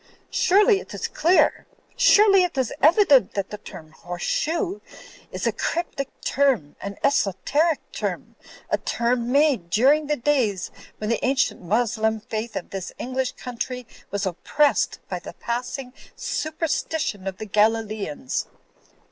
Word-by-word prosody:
Surely 405 +3 +4
it - - -10
is - - -3
clear, 345 +4 +2 0.3
surely 420 -5 +6
it 355 -5 -1
is 260 -3 0
evident 290 - +5
that 200 -1 -2
the 210 - -6
term 160 -6 -11
'horse 175 +2 -7
shoe' 345 +5 -1 0.5
is - - -4
a - - +3
cr)rp 340 +1 -2
tic 275 -1 -3 0.2
term, 260 - +1
an 200 0 -6
esoteric 280 - +2
term, - - -4 0.4
a - - +2
term 240 0 0
made 275 - +3
during 280 - +4
the 300 - +1
days 240 -8 0 0.3
when 215 +1 -2
the - - -1
ancient 265 +1 +1
Moslem 220 +3 0
faith 220 +2 -5
of - - -5
this 195 -2 -5
English 255 +1 -2
country 250 0 -5 0.2
was 200 0 -2
oppressed 280 - +1
by - - -4
the - - -9
passing 250 +2 -4 0.2
superstition 310 - -2
of 190 -1 -4
the 215 - -6
Galileans. 210 - 0
245 Hz, 140 wpm, -24 LUFS, 210-300 Hz, 0.5 s, surely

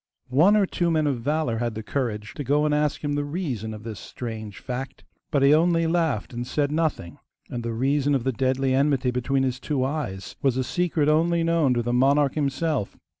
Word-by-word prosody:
One 175 +11 +5
or 205 - +4
two 175 -2 -1
men 155 -2 +2
of 135 -5 -1
valour 145 -3 0
had 120 -2 -2
the 110 - -5
courage 110 -4 -3
to 145 - -5
go 145 +3 +2
and 150 - +1
ask 150 0 0
him 145 -1 -1
the 145 0 0
reason 145 - -3
of 105 -1 -8
this 110 -4 -6
strange 110 +1 -7
fact, 130 +1 -6 0.3
but 140 -3 +1
he 140 +2 +6
only 165 +1 +3
laughed 160 -8 0
and 120 +1 -4
said 145 +1 0
nothing; 155 - -2 0.3
and 120 - -3
the 115 0 -3
reason 140 +4 +1
of 130 - -1
the 130 - +1
deadly 130 +2 0
enmity 135 -2 +2
between 135 +2 0
his 130 0 -1
two 140 -4 -1
eyes 130 -10 -4
was 135 -2 +2
a 130 - +1
secret 165 0 0
only 165 +2 +3
known 165 -6 +2
to 120 - 0
the 120 +1 -1
monarch 140 +2 +3
himself. 145 -4 -1
140 Hz, 215 wpm, -25 LUFS, 120-150 Hz, 0.3 s, he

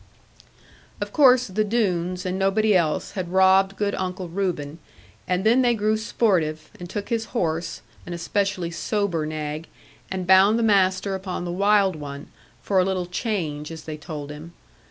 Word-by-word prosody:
Of - - -5
course, 255 -4 +6
the 210 +1 -1
Doones, 185 -5 -1
and 185 +1 -2
nobody 205 +2 +2
else, 160 -4 +1
had 180 -3 -5
robbed 190 +1 +4
good 200 0 0
Uncle 185 -1 -4
Reuben; 165 -5 -3 0.5
and 180 +1 0
then 235 +4 +4
they 240 -2 +3
grew 215 0 +1
sportive, 170 -9 0
and 175 -1 -8
took 205 +2 -5
his 230 -1 -1
horse, 165 -3 -2 0.2
an 175 - -5
especially 180 0 -1
sober 175 -3 -1
nag, 155 +1 -4 0.4
and 185 -1 -3
bound 190 +4 +6
the 235 - +1
master 195 -2 +2
upon 190 -2 -4
the 175 - -3
wild 200 0 +3
one, 145 -1 -8 0.3
for 195 -2 +2
a - - +4
little 185 -1 -1
change 175 -6 -3
as 160 - -8
they 155 - -6
told 150 -2 -7
him. 155 +3 -10
185 Hz, 165 wpm, -24 LUFS, 170-205 Hz, 0.5 s, course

